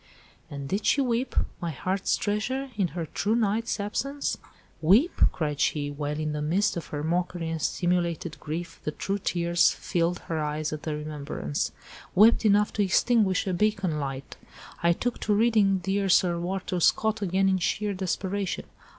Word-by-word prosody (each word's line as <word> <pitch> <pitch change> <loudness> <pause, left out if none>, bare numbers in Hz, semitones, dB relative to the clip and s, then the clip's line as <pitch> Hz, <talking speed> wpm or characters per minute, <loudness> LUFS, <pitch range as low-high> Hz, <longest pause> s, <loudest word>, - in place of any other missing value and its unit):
"And 140 -1 -6
did 200 +7 -1
she - - +4
weep, 250 -1 0 0.3
my 170 - -2
heart's 185 +6 -1
treasure, 255 +6 -2
in 200 -3 +1
her 170 - -1
true 205 +8 -1
knight's 225 0 0
absence?" 275 +8 -2 0.5
"Weep?" 215 - +5 0.2
cried 150 -3 -3
she, 145 -1 0
while—in 150 +1 -3
the 150 0 -3
midst 180 +8 +1
of 170 - -5
her 145 -1 -4
mockery 175 0 -1
and 160 -1 -3
simulated 170 -4 -1
grief, 165 +5 -6
the - - -1
true 195 +6 -3
tears 170 -2 +2
filled 175 0 -1
her 165 -1 -3
eyes 150 0 -2
at 155 - -5
the 155 -1 -3
remembrance, 140 - -3 0.4
"'wept 220 +3 +6
enough 210 0 +4
to 210 - +1
extinguish 200 -1 +2
a 190 - -1
beacon 190 -4 0
light'—I 140 +4 -3
took 245 +7 -3
to 210 - +1
reading 210 -3 +4
dear 195 +2 -1
Sir 175 -1 +4
Walter 185 +1 -2
Scott 220 +5 +2
again 195 0 +2
in 190 -1 +2
sheer 205 +4 0
desperation. 190 +1 -2
180 Hz, 160 wpm, -27 LUFS, 155-205 Hz, 0.5 s, wept